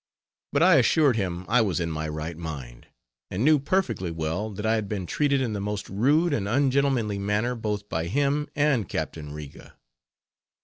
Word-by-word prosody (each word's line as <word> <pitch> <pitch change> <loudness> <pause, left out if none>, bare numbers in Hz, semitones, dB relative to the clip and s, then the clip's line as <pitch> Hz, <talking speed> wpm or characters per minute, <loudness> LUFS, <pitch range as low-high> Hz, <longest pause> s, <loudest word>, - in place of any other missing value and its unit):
But 145 +3 +3
I 180 -3 +7
assured 135 +1 +4
him 90 -4 -2
I 115 +3 +4
was 100 -5 0
in 85 -1 -2
my 80 0 -3
right 80 +2 -4
mind, 70 -8 -8 0.4
and 105 +8 -1
knew 155 -1 +5
perfectly 135 - 0
well 80 +6 -2
that 105 +1 -6
I 110 - +3
had 110 -3 -1
been 100 -4 -3
treated 140 - +1
in 120 -4 -1
the 105 - -3
most 105 0 -3
rude 145 - +2
and 100 -7 -1
un 135 +5 +2
gentlemanly 125 -7 +1
manner 105 +5 0
both 105 -3 -3
by 80 -2 -2
him 145 - +1
and 140 - +1
Captain 75 -2 -4
Riga. 75 -2 -10
105 Hz, 185 wpm, -26 LUFS, 85-140 Hz, 0.4 s, I